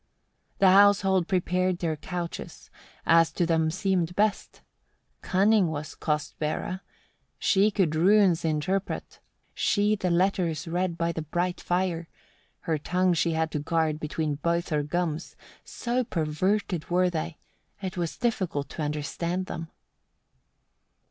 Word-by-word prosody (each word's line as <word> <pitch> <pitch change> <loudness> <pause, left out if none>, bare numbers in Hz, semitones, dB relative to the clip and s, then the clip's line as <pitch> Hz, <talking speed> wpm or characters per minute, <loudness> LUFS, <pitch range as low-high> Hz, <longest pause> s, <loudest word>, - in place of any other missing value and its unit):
9. 195 - +6
The - - +6
household 195 -3 +5
prepared 185 0 +1
their 165 -3 -1
couches, 175 +2 -6 0.3
as 165 0 +5
to 175 - +1
them 160 -1 +2
seemed 180 -1 0
best. 210 +1 0 0.6
Cunning 200 0 +3
was 155 -1 -5
Kostbera, 155 +4 -2 0.6
she 200 +1 +3
could 190 -7 +1
runes 185 +1 +4
interpret; 165 +5 -2 0.3
she 210 +1 +2
the 185 -3 -1
letters 175 -2 +1
read 175 0 -1
by 170 0 0
the 165 - -4
bright 175 +4 -2
fire; 175 -2 -1 0.5
her 160 -2 -1
tongue 180 +4 +1
she 170 0 +1
had 160 0 0
to 150 - -2
guard 155 0 0
between 155 0 -2
both 170 +2 0
her 150 -2 +1
gums 165 +1 -3 0.3
so 245 +1 -2
perverted 175 0 -1
were 180 +1 +2
they, 165 0 -4 0.4
it 190 -3 -5
was 175 -3 -3
difficult 185 - -1
to - - -6
understand 155 +5 -2
them. 165 -2 -6
175 Hz, 130 wpm, -27 LUFS, 160-190 Hz, 0.6 s, 9